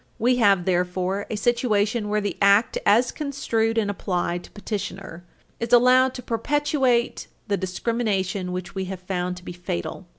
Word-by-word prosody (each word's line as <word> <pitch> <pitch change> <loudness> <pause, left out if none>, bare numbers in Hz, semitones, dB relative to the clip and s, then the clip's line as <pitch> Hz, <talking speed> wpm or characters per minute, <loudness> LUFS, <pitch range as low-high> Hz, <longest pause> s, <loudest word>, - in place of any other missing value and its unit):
We 245 +2 +2
have 200 -6 +4
therefore 185 +2 -1
a - - -2
situation 220 -2 +1
where 210 0 +1
the 205 - -2
Act, 200 +3 +4
as 230 +5 +4
construed 230 -6 -1
and 220 -2 +2
applied 175 -3 -2
to - - -15
petitioner, 195 -4 -6 0.4
is 235 0 -3
allowed 255 +2 +5
to 250 - -7
perpetuate 260 0 0 0.2
the 205 - +1
discrimination 190 -1 -2
which 180 0 -5
we 190 -1 -3
have 190 -1 -6
found 180 -1 -3
to 180 - -13
be - - -6
fatal. 175 - -5
205 Hz, 160 wpm, -24 LUFS, 185-235 Hz, 0.4 s, allowed